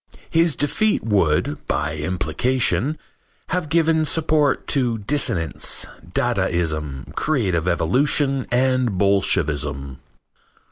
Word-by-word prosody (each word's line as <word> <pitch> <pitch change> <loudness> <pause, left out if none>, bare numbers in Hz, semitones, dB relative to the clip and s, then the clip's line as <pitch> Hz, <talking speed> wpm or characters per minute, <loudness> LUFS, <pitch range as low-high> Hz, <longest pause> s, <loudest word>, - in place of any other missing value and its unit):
His 165 -1 +3
defeat 210 +9 0
would, 80 -8 +1
by 80 - -1
implication, 110 - 0 0.5
have 180 -4 -2
given 160 0 +2
support 155 -2 +1
to 125 -5 +1
dissonance, 105 - 0 0.2
dadaism, 75 -6 -1
creative 95 - 0
evolution 135 - +1
and 125 -4 +1
bolshevism. 75 -9 0
115 Hz, 85 wpm, -21 LUFS, -, 0.5 s, His